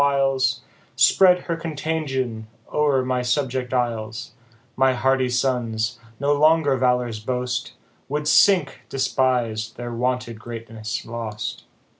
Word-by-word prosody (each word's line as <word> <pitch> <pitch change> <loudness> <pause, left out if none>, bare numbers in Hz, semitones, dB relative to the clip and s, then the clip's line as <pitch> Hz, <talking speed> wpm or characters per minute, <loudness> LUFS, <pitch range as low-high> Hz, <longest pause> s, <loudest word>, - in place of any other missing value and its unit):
viles, 135 -2 +2 0.3
Spread 180 -2 +5
her 170 - -3
contagion 145 -8 -3 0.3
o'er 145 -4 +2
my 125 -1 0
subject 125 0 -1
isles, 115 -3 -2 0.4
My 130 0 +3
hardy 130 0 +2
sons, 120 -3 -1 0.2
no 145 +1 +2
longer 155 -1 +4
valour's 125 -3 +1
boast, 125 +2 -3 0.4
Would 150 +1 -2
sink, 165 -6 +4
despis'd, 120 -4 0
their 120 0 -5
wonted 125 -1 -2
greatness 115 -2 -6
lost. 115 -2 -5
125 Hz, 110 wpm, -23 LUFS, 115-140 Hz, 0.4 s, Spread